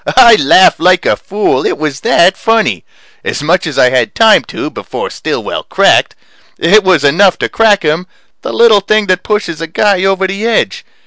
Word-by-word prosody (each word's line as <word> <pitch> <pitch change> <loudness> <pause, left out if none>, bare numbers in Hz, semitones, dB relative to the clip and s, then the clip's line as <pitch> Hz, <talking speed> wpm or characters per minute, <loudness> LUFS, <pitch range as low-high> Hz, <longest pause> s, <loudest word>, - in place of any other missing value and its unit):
I 235 -3 +7
laughed 185 +2 +3
like 180 +1 +1
a - - +1
fool 200 -10 -2
it - - -2
was 150 -2 -4
that 190 -5 +2
funny. 225 - -1 0.4
As 145 - -4
much 170 +3 0
as 150 - -6
I 125 - +3
had 130 +10 -1
time 225 -1 +4
to, - - -7
before - - -7
Stillwell - - -5
cracked. - - +1 0.4
It 205 +5 +3
was 185 -6 +1
enough 175 +7 +2
to - - -2
crack 215 -4 +1
him 160 +4 -2 0.3
the - - -6
little 225 -3 +3
thing 215 +2 0
that 185 -1 -1
pushes 210 -7 -4
a 165 - -4
guy 190 +3 0
over 195 0 0
the 195 +4 -3
edge. 230 - -1
190 Hz, 190 wpm, -11 LUFS, 165-215 Hz, 0.4 s, I